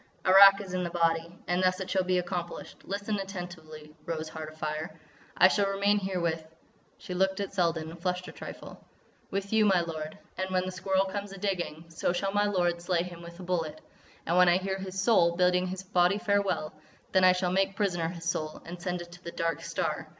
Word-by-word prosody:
"Arrak 195 +1 +9
is 190 -2 -8
in 185 - 0
the 175 - -2
body. 165 0 0
And 175 +1 +1
thus 185 0 +2
it 190 - -4
shall 190 0 +1
be 180 0 +1
accomplished: 175 -1 -4
listen 205 +1 -2
attentively, 175 -5 -8
Rose 160 -1 -3
Heart 155 -1 -7
Afire!—I 155 +3 -1
shall 200 +1 +2
remain 200 +1 +2
here 190 -2 -2
with——" 165 -2 -1 0.5
she 180 - -7
looked 190 +1 +1
at 200 -1 -3
Selden 165 -4 0
and 170 0 -12
flushed 180 0 -2
a - - -7
trifle, - - -10 0.5
"—with 195 +1 -3
you, 220 -1 +5
my 190 -4 +4
lord. 155 -2 -5 0.2
And 190 0 -1
when 185 0 +1
the 185 - -3
Squirrel 190 +1 +1
comes 200 +1 -5
a - - -8
digging, 180 -5 -3
so 165 +1 -1
shall 195 +2 -1
my 205 0 +3
lord 175 -3 +1
slay 175 -1 +1
him 175 -1 -9
with 170 +1 -11
a - - -7
bullet.... 165 -4 -2 0.5
And 170 - +1
when 180 -1 +7
I 175 - +5
hear 190 +1 -3
his 190 0 -5
soul 185 -5 +4
bidding 180 +1 +3
his 185 +1 -5
body 180 +1 +3
farewell, 200 -7 0 0.4
then 190 -1 +4
I 185 0 +7
shall 180 -1 0
make 195 +1 +1
prisoner 175 -6 0
his 170 -1 -8
soul.... 155 -2 -2
And 175 +1 -8
send 180 -1 -2
it 175 - -15
to 180 +1 -14
the - - -5
Dark 165 -1 -2
Star.... - - -2
180 Hz, 215 wpm, -29 LUFS, 170-195 Hz, 0.5 s, Arrak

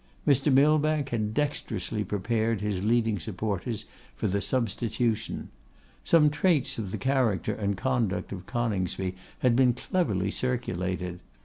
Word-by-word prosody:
Mr. 145 +1 +4
Millbank 150 +1 +3
had 110 -3 -1
dexterously 110 -7 -2
prepared 110 +3 0
his 100 -2 -2
leading 110 -2 +2
supporters 105 +4 -3 0.3
for 70 - -4
the 100 0 +1
substitution. 115 -1 -1 0.5
Some 150 -3 +5
traits 150 -5 +2
of 105 -4 -3
the - - -2
character 130 -7 +1
and 100 -2 -2
conduct 120 -5 0
of 95 -2 -7
Coningsby 95 -6 -1 0.3
had 125 -2 +4
been 125 -1 +5
cleverly 105 - 0
circulated. 90 -8 -2
115 Hz, 125 wpm, -28 LUFS, 100-130 Hz, 0.5 s, Some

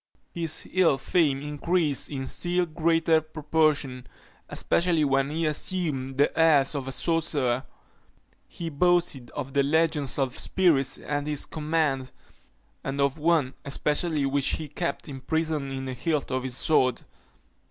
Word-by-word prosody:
His 165 -2 -1
ill 175 -7 +3
fame 140 -1 +1
increased 150 0 0
in 135 -2 -4
still 175 +5 0
greater 165 0 +2
proportion, 150 -4 0 0.4
especially 170 -3 +1
when 135 0 +1
he 160 +2 -1
assumed 150 -4 -2
the 145 - +2
airs 155 -4 +4
of 135 -3 -4
a - - -3
sorcerer. 135 -3 0 0.8
He 165 -1 -6
boasted 170 -5 +1
of 135 -2 -5
the 140 - +3
legions 150 -1 +1
of 135 -3 -1
spirits 145 -8 +2
at 145 0 -3
his 150 -2 0
command; 150 -4 -1 0.7
and 135 +1 -4
of 140 +2 +1
one 155 -4 +2
especially, 150 +2 0
which 140 0 +1
he 155 - -4
kept 170 +4 -4
imprisoned 150 +1 -2
in 135 0 -4
the 130 - -4
hilt 145 +3 -2
of 130 0 0
his 130 -1 -4
sword. 130 -6 +2
150 Hz, 140 wpm, -26 LUFS, 135-165 Hz, 0.8 s, airs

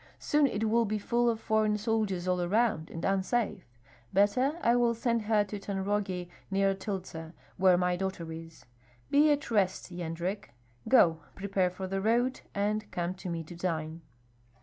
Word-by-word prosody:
Soon 295 -1 +2
it 220 -3 -1
will 230 +1 +3
be 215 0 -1
full 235 +3 +1
of 225 -1 -1
foreign 215 -1 +1
soldiers 210 -4 -1
all 180 -1 +1
around, 190 -3 +1
and 165 - -5
unsafe. 195 +1 0 0.4
Better, 210 +9 +3
I 235 +1 +4
will 240 -1 +3
send 230 0 0
her 210 -1 +2
to 205 0 -6
Tanrogi, 195 -2 -2 0.2
near 195 0 +2
Tyltsa, 185 -5 -6 0.2
where 185 -1 +5
my 180 0 +1
daughter 185 -3 -4
is. 165 0 -10 0.5
Be 295 +2 +5
at 290 -4 -1
rest, 190 -3 +1
Yendrek. 175 +3 -4 0.4
Go, 170 -11 +5 0.2
prepare 195 -2 0
for 185 +1 -6
the 195 +1 -2
road, 240 +5 +1
and 210 +1 -1
come 175 0 -2
to 185 -1 -7
me 165 -1 -3
to 165 +2 -10
dine." 165 -2 -3
195 Hz, 165 wpm, -30 LUFS, 180-220 Hz, 0.5 s, where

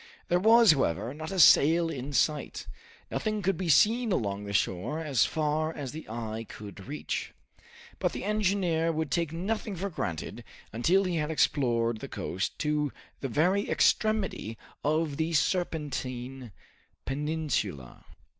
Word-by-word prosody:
There 175 - +3
was, 225 +1 +7
however, 125 - 0
not 155 +2 -6
a 195 - -3
sail 165 +1 +6
in 135 0 -5
sight; 150 +2 0 0.5
nothing 215 -2 -2
could 190 +1 +2
be 175 0 -3
seen 225 - +4
along 105 - -1
the 100 - -5
shore 100 - 0
as 145 -8 +2
far 155 0 0
as 145 -5 -6
the 155 -4 -9
eye 110 -1 -4
could 100 -2 -10
reach. 75 +1 -4 0.6
But - - +1
the - - -5
engineer 190 -5 +1
would 160 -3 -2
take 170 -1 0
nothing 200 +4 -3
for 195 +3 -4
granted 80 - -4 0.3
until 170 - +3
he 180 -3 -1
had 150 -1 -1
explored 120 -7 +1
the - - -6
coast 95 +3 -3
to 150 -2 0 0.3
the 135 - -3
very 180 - +2
extremity 210 - +1 0.3
of 155 -1 0
the 160 +1 -1
Serpentine 135 - -2 0.5
Peninsula. 140 - -3
155 Hz, 145 wpm, -29 LUFS, 125-175 Hz, 0.6 s, was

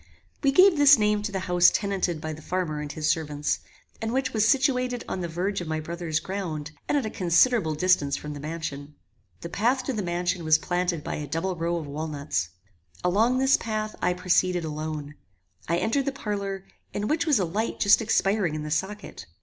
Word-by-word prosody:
We 275 - +3
gave 365 +3 +6
this 285 -1 +8
name 210 -1 +2
to 210 0 -3
the 190 -1 -2
house 180 -1 +5
tenanted 190 -5 -1
by 155 0 -4
the 155 - -10
farmer 165 -4 -2
and 150 -1 -5
his 155 0 -3
servants, 150 -2 0 0.4
and 225 0 -2
which 260 +1 -1
was 215 -1 +3
situated 250 -2 +1
on 185 - -3
the 175 - -2
verge 180 +4 -2
of 175 - -6
my 155 0 -1
brother's 165 0 -3
ground, 165 -6 -4 0.2
and 295 - +3
at 275 - 0
a - - -2
considerable 175 -1 +3
distance 150 -4 +2
from 150 0 -6
the 145 - -7
mansion. 150 -2 -6 0.5
The 170 - -6
path 245 +8 +1
to 265 - -2
the 215 - -2
mansion 175 -1 -1
was 155 0 +5
planted 175 -2 -1
by - - -4
a 150 - -5
double 170 +6 -2
row 170 +1 -1
of 165 -3 -3
walnuts. 145 - -3 0.5
Along 220 +8 +3
this 265 +1 +4
path 215 -1 -3
I 180 0 +1
proceeded 180 -1 +1
alone. 155 -1 -5 0.5
I 170 - +1
entered 225 +9 0
the 275 - 0
parlour, 200 -6 -4 0.3
in 205 +1 -1
which 325 +4 0
was 295 -5 +4
a 190 - +1
light 210 +7 -2
just 200 +3 +5
expiring 195 -6 +1
in 155 - -4
the 150 - -5
socket. 190 - -4
180 Hz, 205 wpm, -26 LUFS, 155-215 Hz, 0.5 s, this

